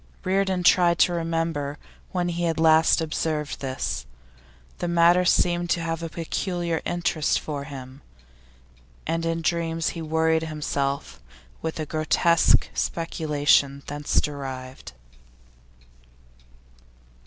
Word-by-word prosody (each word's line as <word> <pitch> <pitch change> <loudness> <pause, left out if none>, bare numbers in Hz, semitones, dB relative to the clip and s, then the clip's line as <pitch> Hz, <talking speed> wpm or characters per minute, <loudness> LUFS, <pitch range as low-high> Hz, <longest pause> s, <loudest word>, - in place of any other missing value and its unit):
Reardon 190 -1 0
tried 175 -1 +5
to 175 - +4
remember 165 -4 -2 0.3
when 175 -1 -1
he 175 0 -2
had 165 -1 -1
last 160 0 +5
observed 155 -1 -2
this; 130 - -3 0.7
the 175 - -2
matter 170 +1 +4
seemed 175 -1 +2
to 170 - +1
have 165 0 -3
a 165 - -4
peculiar 170 0 -2
interest 170 -3 0
for 145 -2 -5
him, 135 -1 -10 1.0
and 165 +1 -1
in 165 0 -2
dreams 165 0 0
he 165 - -6
worried 160 0 +1
himself 140 - -3 0.4
with 160 0 -4
a 155 - -2
grotesque 160 +2 +3
speculation 145 -4 +1
thence 145 0 0
derived. 130 - -6
160 Hz, 110 wpm, -25 LUFS, 145-170 Hz, 1.0 s, tried